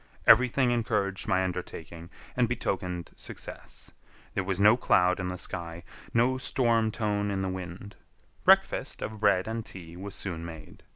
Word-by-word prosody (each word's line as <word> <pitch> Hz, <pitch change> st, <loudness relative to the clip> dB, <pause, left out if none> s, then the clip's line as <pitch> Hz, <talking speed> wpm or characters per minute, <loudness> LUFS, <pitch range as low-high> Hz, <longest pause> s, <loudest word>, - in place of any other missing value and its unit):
Everything 125 Hz, +2 st, +6 dB
encouraged 105 Hz, -5 st, 0 dB
my 95 Hz, 0 st, +2 dB
undertaking 85 Hz, -2 st, -6 dB, 0.3 s
and 120 Hz, -2 st, +2 dB
betokened 90 Hz, -7 st, -2 dB
success. -, -, -8 dB, 0.4 s
There 95 Hz, -, 0 dB
was 95 Hz, 0 st, -2 dB
no 105 Hz, +3 st, +7 dB
cloud 90 Hz, -6 st, +3 dB
in 95 Hz, -, -2 dB
the 90 Hz, 0 st, -4 dB
sky, 85 Hz, -1 st, -5 dB, 0.3 s
no 125 Hz, +3 st, +2 dB
storm 115 Hz, -4 st, +2 dB
tone 105 Hz, -2 st, -1 dB
in 95 Hz, -1 st, -1 dB
the 95 Hz, -, -1 dB
wind. 95 Hz, +2 st, -7 dB, 0.5 s
Breakfast -, -, +3 dB
of 110 Hz, -1 st, -5 dB
bread 100 Hz, -3 st, +3 dB
and 115 Hz, 0 st, -3 dB
tea 85 Hz, -5 st, -10 dB
was 95 Hz, +2 st, -7 dB
soon 85 Hz, -4 st, -4 dB
made. 80 Hz, -2 st, -10 dB
95 Hz, 155 wpm, -28 LUFS, 90-110 Hz, 0.5 s, no